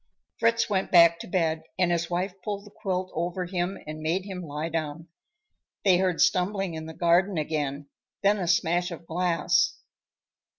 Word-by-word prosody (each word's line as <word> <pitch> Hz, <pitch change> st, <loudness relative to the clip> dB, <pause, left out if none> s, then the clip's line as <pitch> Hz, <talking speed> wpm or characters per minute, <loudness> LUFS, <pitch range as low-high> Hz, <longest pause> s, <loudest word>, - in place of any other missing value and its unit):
Fritz 230 Hz, 0 st, +3 dB
went 195 Hz, -3 st, 0 dB
back 170 Hz, -1 st, +6 dB
to -, -, -8 dB
bed 165 Hz, -3 st, 0 dB, 0.2 s
and 180 Hz, -1 st, +2 dB
his 170 Hz, -1 st, 0 dB
wife 180 Hz, +2 st, -1 dB
pulled 205 Hz, -1 st, -4 dB
the 205 Hz, -, -14 dB
quilt 185 Hz, -3 st, -3 dB
over 175 Hz, +2 st, -2 dB
him 180 Hz, +1 st, -2 dB
and 155 Hz, 0 st, -6 dB
made 170 Hz, +5 st, -1 dB
him 190 Hz, -3 st, -6 dB
lie 150 Hz, -1 st, -4 dB
down. 160 Hz, 0 st, -4 dB, 0.8 s
They 185 Hz, -3 st, +6 dB
heard 185 Hz, -3 st, +1 dB
stumbling 185 Hz, 0 st, +2 dB
in 160 Hz, 0 st, -6 dB
the 160 Hz, -, -9 dB
garden 175 Hz, +2 st, +3 dB
again, 145 Hz, -2 st, -2 dB, 0.4 s
then 205 Hz, +1 st, +4 dB
a 180 Hz, -, -2 dB
smash 175 Hz, 0 st, +2 dB
of 170 Hz, -1 st, -9 dB
glass. 165 Hz, -1 st, +1 dB
175 Hz, 170 wpm, -27 LUFS, 165-190 Hz, 0.8 s, back